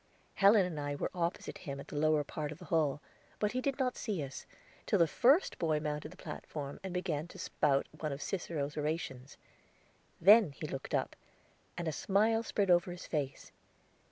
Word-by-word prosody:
Helen 200 0 +6
and 165 -4 -4
I 145 0 -2
were - - -2
opposite 170 -1 -2
him 140 -1 -6
at - - -9
the - - -7
lower 155 0 +3
part 150 +1 -4
of 155 - -8
the - - -11
hall, 150 -3 +1 0.4
but 210 0 0
he 255 - -1
did 275 0 -1
not 255 -2 0
see 200 - -2
us, 135 -1 -8 0.4
till 205 - +3
the 170 - +6
first 265 - +3
boy 155 -2 +1
mounted 150 0 -3
the - - -14
platform, 145 -2 -6
and 190 - -4
began 175 -4 -2
to - - -12
spout 140 -2 +1
one 155 - -4
of 140 - -4
Cicero's 150 -5 -3
orations; 150 -4 -3 0.8
then 200 -2 +7
he 155 - -6
looked 135 -2 -4
up, - - -1 0.6
and 170 - -3
a - - +1
smile 215 +7 +2
spread 200 -4 +1
over 175 +1 +4
his 175 0 -7
face. 140 -4 -3
160 Hz, 190 wpm, -33 LUFS, 145-195 Hz, 0.8 s, then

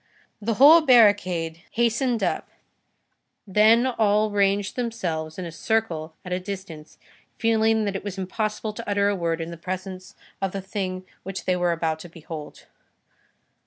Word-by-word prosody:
The 225 +1 -1
whole 305 +7 +8
barricade 185 - +3
hastened 235 +1 +1
up, - - -1 1.0
then 215 +4 +4
all 215 -4 +2
ranged 200 -1 +1
themselves 175 -10 -3
in 185 - -4
a 170 - -6
circle 165 -4 -2
at 180 - -3
a 180 - 0
distance, 185 -5 -8 0.4
feeling 220 -1 +2
that 200 -1 -2
it 195 - -4
was 200 -2 -5
impossible 215 +3 -3
to 210 - -7
utter 200 0 +2
a 205 - 0
word 170 -2 -1
in 165 +1 -5
the 170 - -8
presence 185 +1 -6 0.3
of 195 -1 -1
the 195 - -3
thing 185 -1 -4 0.2
which 195 0 -6
they 185 - +2
were 175 -1 +1
about 160 -1 -1
to 175 - -10
behold. 160 -2 -9
195 Hz, 160 wpm, -24 LUFS, 175-220 Hz, 1.0 s, whole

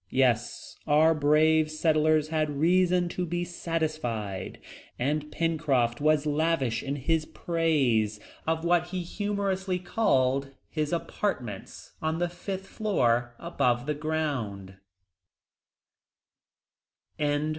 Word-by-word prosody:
Yes, 125 -3 0
our 155 +2 +5
brave 155 +1 +3
settlers 155 -1 +2
had 155 -2 -1
reason 180 +2 +3
to 180 - -3
be 175 0 -2
satisfied, 155 - -3 0.4
and 150 +4 -1
Pencroft 145 -7 0
was 155 0 +3
lavish 150 -6 +1
in 140 0 -3
his 155 +3 0
praise 135 -11 +1 0.3
of 160 +1 0
what 175 0 +3
he 180 0 -3
humorously 195 -1 -2
called, 135 - +1 0.2
"his 155 -2 -1
apartments 130 - -4
on 160 +1 -1
the 175 +1 0
fifth 190 +2 -6
floor 120 - 0
above 125 -7 0
the 150 - 0
ground!" 140 -11 -3
155 Hz, 100 wpm, -28 LUFS, 135-170 Hz, 0.4 s, our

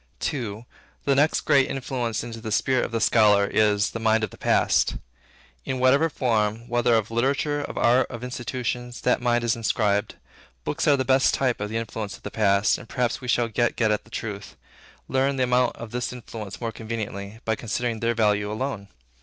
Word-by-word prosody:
II. 115 -4 -5 0.4
The 140 - +3
next 145 +3 +3
great 135 -2 +3
influence 125 -4 -2
into 115 -1 -7
the 110 -1 -5
spirit 130 +3 +2
of - - -7
the 115 - -1
scholar, 105 -3 +4
is, 105 0 +2
the 115 - -5
mind 110 0 +2
of - - -2
the - - -13
Past, - - +2 0.7
in 130 - -3
whatever 135 +5 +4
form, 115 -4 0
whether 120 0 +2
of 110 -1 0
literature, 140 +5 0
of - - -6
art, 125 +2 +3
of 120 -1 -7
institutions, 125 -1 -4
that - - +2
mind 120 -1 +1
is 120 -1 +1
inscribed. 105 -3 0 0.5
Books - - -2
are 145 -2 +5
the 130 - -1
best 130 0 +3
type 125 -5 0
of 105 - -2
the 110 - -2
influence 110 -2 -5
of - - -26
the 105 - -6
past, 100 -1 +2
and 120 - -13
perhaps 125 0 -1
we 125 - -7
shall 120 -1 +2
get 120 +1 0
at 110 -2 +2
the - - -20
truth, 105 -3 -6 0.5
learn 135 +1 +1
the 130 - +1
amount 125 0 +2
of 115 -2 -9
this 125 0 -2
influence 110 -5 -8
more 115 -1 -3
conveniently, 110 -2 -6
by 110 - +1
considering 115 +1 -2
their 115 +1 0
value 105 -2 +1
alone. 110 -3 -4
115 Hz, 195 wpm, -25 LUFS, 110-125 Hz, 0.7 s, are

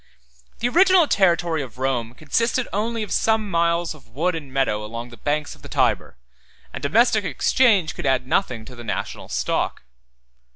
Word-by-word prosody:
The 240 - +2
original 370 +2 +5
territory 170 - +2
of 125 -3 -9
Rome 125 -3 -2
consisted 230 - 0
only 225 +2 -1
of 210 - -8
some 220 -2 +1
miles 170 0 +1
of 155 - -18
wood 160 +10 -1
and 150 -5 -7
meadow 130 -6 0
along 115 +3 -6
the - - -10
banks 145 +4 -2
of - - -18
the - - -11
Tyber; - - 0 0.6
and - - -6
domestic 220 - +3
exchange 190 - +2
could - - -4
add 130 -1 +2
nothing 125 - -1
to 125 - -11
the 120 - -9
national 115 - -5
stock. 60 +1 -1
160 Hz, 170 wpm, -22 LUFS, 130-215 Hz, 0.6 s, original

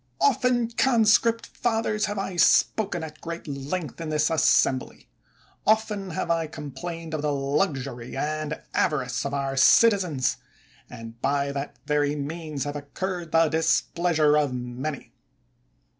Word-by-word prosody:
Often, 240 +6 +2
conscript 230 -1 +3
fathers, 225 -2 -1
have 205 0 -4
I 195 -1 -3
spoken 175 +1 +3
at 155 -1 -9
great 170 0 -6
length 145 +3 -4
in 165 - -4
this 155 0 +1
assembly; 135 -4 +2 0.6
often 210 -3 +1
have 170 0 -2
I 165 -1 0
com 150 -2 -8
plained 165 +3 -7
of 155 - -2
the 150 0 0
luxury 135 -4 -2
and 150 +1 -2
avarice 130 -5 0
of 140 - -6
our 135 -1 -2
citizens, 165 - +4 0.5
and, 115 0 -10
by 140 0 0
that 140 +1 -5
very 145 -1 +1
means, 150 0 -4
have 145 +1 -4
incurred 170 +4 -5
the 165 0 +4
dis 160 +1 +3
pleasure 160 -4 +1
of 140 -4 -1
many. 125 +4 -5
155 Hz, 140 wpm, -25 LUFS, 140-180 Hz, 0.6 s, citizens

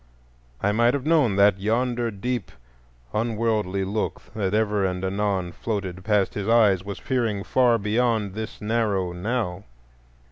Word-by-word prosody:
I 105 - +3
might 120 +4 +3
have 140 -1 -4
known 150 -10 +3
that 100 -1 +4
yonder 120 +3 0
deep 120 +4 -3 0.6
unworldly 110 -3 0
look 105 +3 -2
that 100 -3 -1
ever 105 -2 +1
and 90 0 -1
anon 95 -2 -1
floated 95 -2 -4
past 105 -2 +1
his 100 -1 -4
eyes 105 -5 +4
was 100 0 -6
peering 115 -7 -1
far 120 0 +3
beyond 110 -1 0
this 110 +1 -6
narrow 105 -4 0
Now. 100 -1 -2
105 Hz, 140 wpm, -24 LUFS, 100-115 Hz, 0.6 s, that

